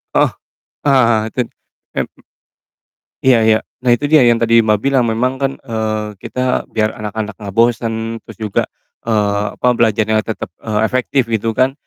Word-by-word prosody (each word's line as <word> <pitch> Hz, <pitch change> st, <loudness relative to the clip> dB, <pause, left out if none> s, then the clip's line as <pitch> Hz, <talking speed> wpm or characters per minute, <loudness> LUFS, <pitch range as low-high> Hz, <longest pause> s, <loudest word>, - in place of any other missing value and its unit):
Heeh. -, -, +4 dB, 0.6 s
Ah 115 Hz, -5 st, +4 dB
ten 125 Hz, -2 st, 0 dB, 0.5 s
em -, -, -1 dB, 1.2 s
iya 125 Hz, -4 st, +5 dB
iya, 110 Hz, 0 st, +4 dB, 0.2 s
nah, 125 Hz, -, +2 dB
itu 130 Hz, +5 st, +2 dB
dia 150 Hz, -2 st, +5 dB
yang 120 Hz, -1 st, +4 dB
tadi 115 Hz, 0 st, +4 dB
Mbak, 105 Hz, -1 st, +2 dB
bilang, 135 Hz, -3 st, +3 dB
memang 125 Hz, +3 st, +1 dB
kan, 135 Hz, 0 st, +1 dB
eee, 110 Hz, -3 st, -3 dB
kita 125 Hz, 0 st, -1 dB
biar 110 Hz, -1 st, 0 dB
anak-anak 105 Hz, 0 st, -4 dB
nggak 100 Hz, -2 st, -7 dB
bosen 115 Hz, -1 st, +1 dB
terus -, -, -12 dB
juga, 105 Hz, -3 st, 0 dB, 0.5 s
eee, 105 Hz, -1 st, +1 dB
apa, 125 Hz, -, +2 dB
belajarnya 110 Hz, -1 st, +2 dB
tetep, 110 Hz, -, -5 dB
eee, 110 Hz, -1 st, -1 dB
efektif, 130 Hz, 0 st, 0 dB
gitu 115 Hz, +1 st, 0 dB
kan, 130 Hz, +1 st, +3 dB
115 Hz, 155 wpm, -17 LUFS, 110-125 Hz, 1.2 s, iya